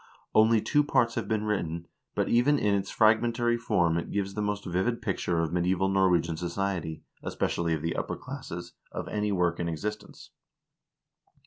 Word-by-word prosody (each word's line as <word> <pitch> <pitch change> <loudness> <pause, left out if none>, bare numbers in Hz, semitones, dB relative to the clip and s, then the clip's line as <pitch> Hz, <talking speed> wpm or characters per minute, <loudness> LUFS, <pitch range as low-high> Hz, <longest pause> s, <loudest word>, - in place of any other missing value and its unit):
Only 110 0 +5
two 150 +5 +3
parts 120 -5 +2
have - - -3
been 110 -2 0
written, 85 -6 -2 0.3
but - - +1
even 130 +5 +4
in 105 -6 +2
its 100 -1 0
frag 110 0 +4
mentary 120 0 +1
form 85 -8 +2
it - - -6
gives 100 -1 -2
the 105 - -3
most 105 0 -2
vivid 95 +7 0
picture 90 -6 -1
of 80 0 -2
medieval 90 +2 +1
Norwegian 90 -4 +2
society, 85 -2 -3 0.2
especially 85 -1 -1
of 75 - -6
the 85 - -1
upper - - -2
classes, 85 +1 -7 0.2
of - - -5
any 105 0 -1
work 90 -3 +1
in 85 -1 -1
existence. 105 +6 -6
95 Hz, 175 wpm, -28 LUFS, 85-110 Hz, 0.3 s, Only